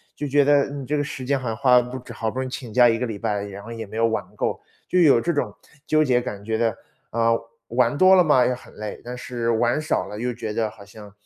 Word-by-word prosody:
就 145 - -4
觉 145 +1 +3
得 145 -1 +4
你 140 -1 -6
这 150 - -1
个 145 - 0
时 135 -3 -6
间 140 +1 +1
好 130 - -5
像 110 -1 -2
花 125 -1 +5
了 125 - +4
不 130 - -5
值， 125 -1 -10
好 110 -1 -2
不 125 - -8
容 130 - -1
易 - - -9
请 125 -4 -6
假 120 +2 +6
1 115 0 +2
个 125 - -1
礼 110 -3 -5
拜， 105 -1 -2
然 100 0 -9
后 115 - -9
也 115 -2 -6
没 110 - -8
有 115 - +3
玩 110 - -1
够， - - -2 0.3
就 180 - +2
有 145 -8 +6
这 170 +8 -1
种 115 -9 -1 0.4
纠 155 0 +4
结 125 -4 +2
感 105 -4 -7
觉 110 0 -1
的， 115 -2 0 0.3
啊， 115 0 +2 0.4
玩 125 +3 +2
多 185 +2 +7
了 180 - +6
嘛， 145 -5 +4
也 125 - +1
很 125 - -11
累， 105 0 -7
但 125 +1 -7
是 120 -2 -3
玩 120 +5 +2
少 155 - 0
了 105 - -8
又 125 +2 -1
觉 110 -2 -5
得 110 0 0
好 105 -2 -14
像 105 0 -13
120 Hz, 305 characters per minute, -23 LUFS, 110-135 Hz, 0.4 s, 多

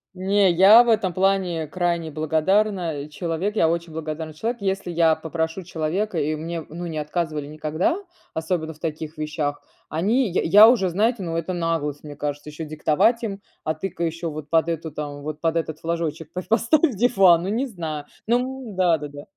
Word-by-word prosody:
Не, 190 +1 +3
я 195 +7 +8
этом 195 -4 0
плане 185 -3 +1
крайне 170 -1 -1
благодарна 160 0 0
человек, 170 +6 -3
я 165 - +4
очень 170 0 -2
благодарный 155 0 -5
человек. 230 +5 -3
Если 190 -2 -2
я 165 -1 +4
попрошу 160 +3 -3
человека, 175 +3 -2
и 155 +2 0
мне, 165 +2 -4
ну, 175 +3 -6
не 160 -2 -4
отказывали 150 -1 -3
никогда, 155 - -1 0.4
особенно 160 0 -2
в - - -22
таких 155 0 -5
вещах, 150 -1 -3 0.3
они 210 - +1
я 180 - +1
я 205 +7 +8
уже, 215 -7 +3
знаете, 210 +4 +1
ну, 165 -1 -3
это 165 +2 -2
наглость, 165 -4 -2
мне 145 -1 -9
кажется, 145 +1 -4
ещё 155 +2 -6
диктовать 155 +10 +2
им: 200 -2 -4 0.2
"А 155 - 0
ты-ка 170 +2 -5
ещё 165 0 -2
вот 150 -1 -8
под 165 0 +3
эту 165 -1 -3
там 145 -1 -6
вот 155 0 -6
под 165 0 +1
этот 160 -2 -2
флажочек 165 -2 -3
по 180 +1 -4
поставь 245 - +2
диван". 195 -7 +5
Ну, 190 - -2
не 235 +6 0
знаю. 160 - -5 0.2
Ну 250 -1 -1
да-да-да. 150 -5 0
165 Hz, 175 wpm, -23 LUFS, 155-195 Hz, 0.4 s, я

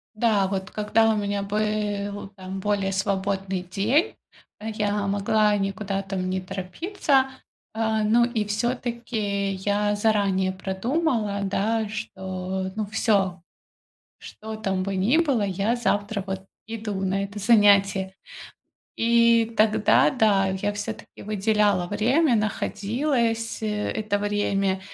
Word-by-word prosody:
Да, 215 -4 +2
вот 190 -1 -3
когда 220 +1 +2
у - - -2
меня 200 -1 -1
был 205 -1 -2
там 190 0 -6
более 200 -1 0
свободный 195 -1 -1
день, 225 - +1 0.4
я 210 -2 -1
могла 205 +1 +2
никуда 195 0 -2
там 190 -1 -3
не 185 0 -1
торопиться, 265 - 0 0.4
а, 220 -1 0
ну, 230 +3 +4
и 235 -3 -1
всё-таки 220 -3 -2
я 205 +2 0
заранее 200 -3 +1
продумала, 210 - -1
да, 215 +3 0
что, 190 -2 -4
ну, 215 -1 -2
всё, 195 -4 +1 0.8
что 220 +1 -8
там 195 -3 -1
бы 195 0 -2
ни 210 +11 +3
было, 275 -10 +2
я 200 +4 0
завтра, 205 -3 -1
вот, 190 0 -5 0.2
иду 220 -2 -4
на 195 +1 0
это 200 +1 -6
занятие. 200 -3 +4 0.8
И 235 0 +4
тогда, 215 +4 +4
да, 210 -7 +3
я 190 +2 -1
всё-таки 210 +2 -7
выделяла 210 -3 +1
время, 240 - +2
находилось, 225 +3 -1
э, - - -1 0.2
это 215 -1 -1
время, 200 -2 0
205 Hz, 120 wpm, -24 LUFS, 195-220 Hz, 0.8 s, ну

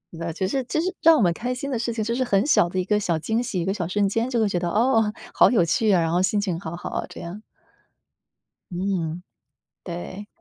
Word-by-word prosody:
那 165 0 -4
其 185 +3 -2
实 265 +6 -1
其 315 - 0
实 370 +3 -1
让 325 -1 +7
我 - - +2
们 175 -3 +3
开 245 +8 -3
心 275 +2 -5
的 240 - -1
事 235 0 -1
情， 225 -2 -2
就 230 - -1
是 255 +2 0
很 200 -1 +2
小 175 - +4
的 185 +1 -2
一 180 - -1
个 210 +1 +2
小 170 -5 0
惊 220 +8 -1
喜、 210 -7 -3
一 170 - -1
个 195 - 0
小 175 -5 -3
瞬 200 +2 +1
间 225 +5 -1
就 240 -3 0
会 220 - +3
觉 180 -3 -1
得， 175 - -2
“哦， 225 +1 +2 0.2
好 - - +6
有 205 -9 +3
趣 215 +6 +2
啊”， 185 - +4
然 165 - 0
后 175 +2 +2
心 205 +2 +1
情 185 -5 -2
好 165 -2 -6
好 175 - -6
啊， - - -3
这 - - -10
样。 190 +6 -8 1.3
嗯， 180 -2 -2 0.6
对。 185 +3 -7
200 Hz, 275 characters per minute, -24 LUFS, 175-230 Hz, 1.3 s, 让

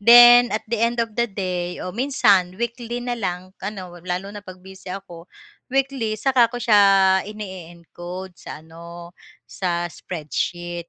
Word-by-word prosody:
then 240 +2 +9
at 215 - -3
the 230 0 -3
end 235 +1 +1
of 230 -2 -1
the 235 +1 0
day, 180 -3 -3
o 180 - -5
minsan 205 -7 +2
weekly 235 +1 -4
na 245 - -2
lang 185 -4 -4
ano 190 -3 -6
lalo 185 +3 -4
na 205 - -8
'pag 185 -2 -11
busy 190 0 -12
ako, 180 -2 -9 0.4
weekly 265 -4 -1
saka 245 0 +3
ko 245 - -7
siya 215 -4 +4 0.5
ine-encode 180 -2 -9
sa 155 -2 -11
ano, 170 +1 -11 0.3
sa 175 -2 -2
spreadsheet, 175 +1 -5
195 Hz, 150 wpm, -22 LUFS, 175-235 Hz, 0.5 s, then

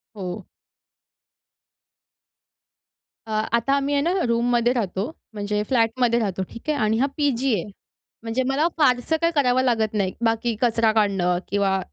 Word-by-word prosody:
हो. 180 -3 -6 2.8
अ, - - -7 0.2
आता 235 +4 +2
आम्ही 280 +1 0
आहे 280 - +2
ना, 335 - +1 0.2
रूममध्ये 240 +1 +2
राहतो, 195 -5 -2 0.3
म्हणजे 210 0 -2
फ्लॅटमध्ये 235 0 +2
राहतो, 190 -3 -2
ठीक 235 +6 -9
आहे. 300 - +1
आणि 220 -1 +1
हा 270 - +3
पी-जी 270 -4 +1
आहे, 195 0 -2 0.5
म्हणजे 230 +3 -1
मला 295 +5 +2
फारसं 255 +1 +2
काही 335 0 +2
करावं 255 -3 +3
लागत 225 -4 +1
नाही 195 -3 0
बाकी 225 0 0
कचरा 230 -2 +3
काढणं 195 -5 +1
किंवा 195 -1 +1
230 Hz, 140 wpm, -23 LUFS, 210-255 Hz, 2.8 s, हा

